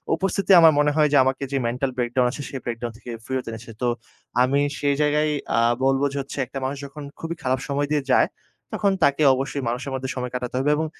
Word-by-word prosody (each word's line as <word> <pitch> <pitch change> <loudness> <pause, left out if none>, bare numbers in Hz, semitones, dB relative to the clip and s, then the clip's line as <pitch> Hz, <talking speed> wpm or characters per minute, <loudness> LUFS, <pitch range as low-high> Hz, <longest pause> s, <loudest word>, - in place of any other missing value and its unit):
উপস্থিতি 195 +3 -1
আমার 165 -1 +8
মনে 150 0 +3
হয় 155 -1 +4
যে 145 - +6
আমাকে 130 +1 -1
যে 140 - 0
mental 125 +3 -1
breakdown 125 +1 +1
আছে 145 - -7
সেই 135 - -5
breakdown 120 0 -4
থেকে 120 0 -9
ফিরত 130 -1 -3
এনেছে। 115 +1 -9
তো 125 - +1 0.6
আমি 140 +2 +2 0.2
সেই 145 -1 +1
জায়গায় 150 +1 +2 0.3
আ - - +4 0.2
বলব 135 0 +2
যে 140 - -4
হচ্ছে 140 - -9
একটা 135 +2 -6
মানুষ 135 +2 -3
যখন 145 +2 -9 0.2
খুবই 165 +1 -4
খারাপ 130 0 +1
সময় 145 0 -1
দিয়ে 150 -2 +1
যায় - - +5 0.5
তখন 200 - +2
তাকে 140 +1 +3
অবশ্যই 135 +2 -2
মানুষের 125 +3 -4
মধ্যে 130 0 -4
সময় 125 -1 -4
কাটাতে 125 0 -4
হবে 140 +3 +2
এবং 160 +2 -1
135 Hz, 220 wpm, -23 LUFS, 125-150 Hz, 0.6 s, আমার